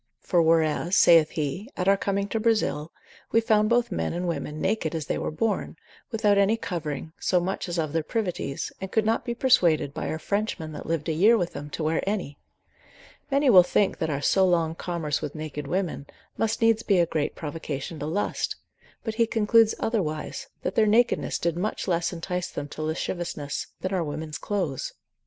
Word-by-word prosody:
For 175 -3 +2
whereas 165 +2 +2
(saith 165 -3 +7
he) 155 - -2
at 180 - -1
our 195 - +6
coming 200 0 -1
to 225 - -1
Brazil, 215 -9 +1 0.4
we 225 - +5
found 215 -2 +3
both 240 0 +2
men 80 -1 -1
and 175 +1 -2
women 150 -2 -3
naked 165 -3 0
as 160 -2 -3
they - - -2
were - - -2
born, 210 +8 -1 0.3
without 210 -4 +2
any 200 +3 +3
covering, 160 -6 -4
so 180 - +2
much 185 +1 -3
as 175 - -3
of 155 -3 -1
their 165 - +1
privities, 180 -6 -3
and 190 0 -5
could 220 -1 +2
not 225 +1 +1
be 240 -1 -3
persuaded, 170 - +3
by - - -3
our 155 - -2
Frenchmen 200 -3 -2
that 150 - -8
lived 165 -1 -1
a 160 - +1
year 210 +9 +5
with 175 -4 -2
them, 145 +1 -7
to 155 - -4
wear 160 +1 +1
any, 185 -9 -3 0.9
Many 280 -1 +4
will 185 -4 +10
think 195 +3 +1
that 160 - -1
our 140 -1 -2
so 190 +7 +4
long 170 -3 +2
commerce 165 -4 -2
with 150 -1 -5
naked 150 -2 -5
women, 175 -4 -2 0.3
must 225 +1 0
needs 225 -1 +4
be 200 -4 +2
a 175 - +4
great 155 -3 -2
provocation 150 0 -5
to 145 - -3
lust; 190 +6 -1 0.5
but 220 - -3
he 230 +1 +2
concludes 225 0 +4
otherwise, 210 +4 -2 0.2
that - - -1
their 220 -1 +3
nakedness 230 +3 +2
did 170 -1 -1
much 200 +5 -2
less 170 -2 +1
entice 180 +1 -3
them 145 - -5
to 155 - -7
lasciviousness, 155 -2 -3
than 185 +1 -2
our 180 -3 +1
women's 155 0 -5
clothes. 185 -10 -2
175 Hz, 195 wpm, -26 LUFS, 155-210 Hz, 0.9 s, will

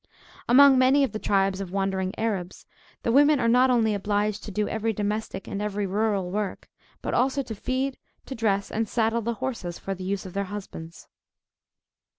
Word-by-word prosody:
Among 270 +1 +7
many 265 +2 +5
of 270 - 0
the 215 - -4
tribes 195 -1 +1
of 190 - -5
wandering 190 0 -1
Arabs, 195 -5 -3 0.4
the 230 - +1
women 290 +3 +5
are 230 - +1
not 250 +3 +5
only 225 -4 +3
obliged 205 +1 -1
to - - -6
do 210 +1 -1
every 220 0 -1
domestic 210 -1 -3
and 200 - -4
every 205 -1 -2
rural 200 -2 0
work, 205 0 -3 0.4
but - - -2
also 270 +3 +1
to 230 - -6
feed, 255 +5 -2 0.3
to - - -6
dress, 200 -4 0
and 220 -1 -1
saddle 230 0 +1
the 235 +1 -2
horses, 200 -7 -4
for 195 - -4
the 185 -1 -8
use 195 +1 -3
of 185 - -8
their 200 0 -1
husbands. 185 -5 -8
210 Hz, 185 wpm, -26 LUFS, 195-235 Hz, 0.4 s, Among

